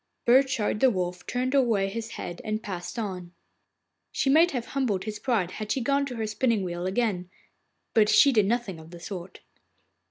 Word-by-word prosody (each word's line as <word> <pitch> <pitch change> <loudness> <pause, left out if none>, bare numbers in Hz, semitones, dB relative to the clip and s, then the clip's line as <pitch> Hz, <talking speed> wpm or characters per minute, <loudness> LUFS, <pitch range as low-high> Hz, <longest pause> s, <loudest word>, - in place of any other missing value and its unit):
Burchard 255 -4 +3
the 260 - +5
Wolf 180 -4 -3
turned 255 +2 -1
away 230 -8 +3
his 230 +3 -5
head 175 - -6
and 215 -1 -3
passed 185 -1 -6
on. 185 -5 -5 0.8
She 270 - +1
might 325 +4 +6
have 245 -6 -3
humbled 240 -9 0
his 215 -1 -5
pride 220 -9 0
had 215 +1 -5
she - - +1
gone 280 +3 +1
to 250 - -6
her 225 -1 -2
spinning 215 0 0
wheel 175 0 -3
again, 190 -3 -1 0.6
but 215 -2 +4
she 280 - +6
did 215 -6 +3
nothing 215 -6 -1
of 160 0 -13
the 175 0 -11
sort. 180 0 -8
215 Hz, 185 wpm, -27 LUFS, 185-250 Hz, 0.8 s, might